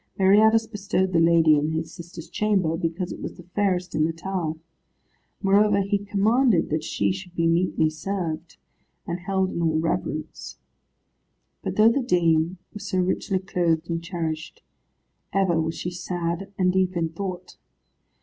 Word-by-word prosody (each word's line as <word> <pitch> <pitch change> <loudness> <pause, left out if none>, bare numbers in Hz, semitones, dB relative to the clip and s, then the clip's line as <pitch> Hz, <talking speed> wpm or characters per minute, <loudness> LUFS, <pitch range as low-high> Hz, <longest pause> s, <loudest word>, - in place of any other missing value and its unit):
Meriadus 215 +4 +5
bestowed 200 -3 -1
the 170 - +4
lady 165 -2 +5
in 155 +2 -1
his 160 0 -3
sister's 170 -1 -10
chamber, 195 -6 +1
because 165 +2 -3
it - - -7
was - - -6
the 175 - -13
fairest 185 -3 0
in 155 0 +2
the 160 - +1
tower. 165 -1 -3 0.9
Moreover 200 +1 +4
he 200 +1 0
commanded 205 - +2
that 155 0 0
she 165 - 0
should 185 -1 -7
be 165 - +1
meetly 165 -1 +2
served, 165 -1 -4 0.5
and 170 +1 -3
held 190 +1 0
in 170 - -3
all 160 -1 +2
reverence. 165 +1 -3 1.0
But - - -4
though 220 +2 +6
the 275 - +1
dame 170 -6 +2 0.2
was 210 - -7
so 185 - -1
richly 185 +1 0
clothed 170 -3 0
and 165 0 -2
cherished, 165 -2 -4 0.7
ever 185 -4 +2
was 160 +1 -2
she 175 - -4
sad 175 +1 -3
and 185 -1 +2
deep 185 -1 +1
in 165 -1 0
thought. 180 +1 -6
180 Hz, 160 wpm, -24 LUFS, 165-195 Hz, 1.0 s, though